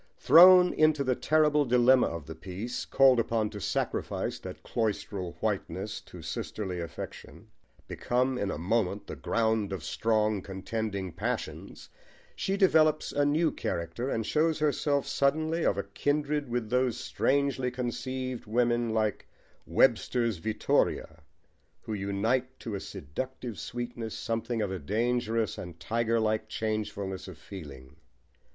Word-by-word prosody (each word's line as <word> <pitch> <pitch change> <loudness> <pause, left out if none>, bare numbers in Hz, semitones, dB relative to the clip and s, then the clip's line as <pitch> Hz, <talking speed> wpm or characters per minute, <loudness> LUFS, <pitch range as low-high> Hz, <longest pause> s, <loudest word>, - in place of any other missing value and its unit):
Thrown 180 +1 +8
into 155 -2 +3
the 130 -1 +2
terrible 150 +2 +3
dilemma 125 0 +5
of 80 -3 -5
the 80 - -7
piece, 95 +9 -5
called 135 -2 +5
upon 110 -2 0
to 105 -1 -7
sacrifice - - -2
that - - -9
cloistral 100 -5 -2
whiteness - - -2
to - - -11
sisterly 95 -4 -4
affection, 85 -1 -8 0.4
become 125 +2 0
in 100 -5 -1
a - - -3
moment 100 +3 0
the - - -7
ground 110 -3 0
of 95 -5 -4
strong, 110 -1 +1
contending 100 0 -4
passions, - - -4 0.5
she 195 +1 -1
develops 155 -5 +4
a 145 0 +2
new 155 +2 +2
character 85 +10 -3
and 115 -4 -1
shows 155 +4 +2
herself 145 -2 +1
suddenly 155 +4 +1
of 100 - +2
kindred 145 0 0
with 120 -2 -2
those 125 -2 +2
strangely 140 -2 0
conceived 125 0 -4
women, 120 0 +1
like 110 -2 0 0.4
Webster's 115 -5 +2
Vittoria, 80 -4 0 0.6
who 110 - -5
unite 110 +6 -1
to 115 - -5
a 100 - -2
seductive 120 - -6
sweetness 120 -2 -5
something 115 0 -2
of 100 - -2
a 95 - -3
dangerous 115 +5 0
and 85 -2 -8
tigerlike 110 +1 0
changefulness 105 -4 -3
of 95 -4 -9
feeling. 70 -7 -11
115 Hz, 130 wpm, -29 LUFS, 100-130 Hz, 0.6 s, Thrown